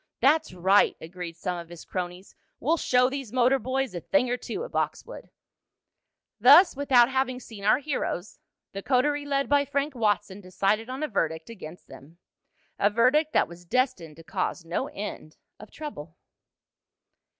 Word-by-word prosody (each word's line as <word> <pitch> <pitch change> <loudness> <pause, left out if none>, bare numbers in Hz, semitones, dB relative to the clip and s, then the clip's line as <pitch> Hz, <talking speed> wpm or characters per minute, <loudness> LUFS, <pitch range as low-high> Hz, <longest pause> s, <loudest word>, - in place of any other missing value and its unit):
"That's 305 +5 +3
right!" 190 +3 +3
agreed 170 0 -8
some 180 0 -3
of 170 -1 -10
his 175 -1 -11
cronies. 180 +1 -6 0.3
"We'll 320 +6 +1
show 250 -4 +3
these 270 -4 -5
motor 255 +2 +3
boys 260 +1 -2
a 175 - -4
thing 255 - +1
or - - +2
two 395 - -5
at - - -11
Boxwood!" - - -4 1.1
Thus, 360 -4 +7
without 260 -4 +4
having 260 -1 0
seen 220 -5 -11
our 215 - +5
heroes, 265 - -4 0.3
the 195 - -6
coterie 285 +4 +1
led 275 -1 0
by 285 0 +3
Frank 285 +1 -2
Watson 205 -4 -1
decided 195 +5 -1
on 260 +4 -4
a - - 0
verdict 160 - -2
against 180 -6 -11
them 155 +5 -14 0.6
a 205 - +4
verdict 255 +8 +3
that - - +3
was 170 +1 -13
destined 210 - -1
to 165 - -14
cause 170 +1 -3
no 170 +2 -2
end 195 -6 -7 0.2
of 215 - -12
trouble. 175 - -9
230 Hz, 160 wpm, -26 LUFS, 180-270 Hz, 1.1 s, Thus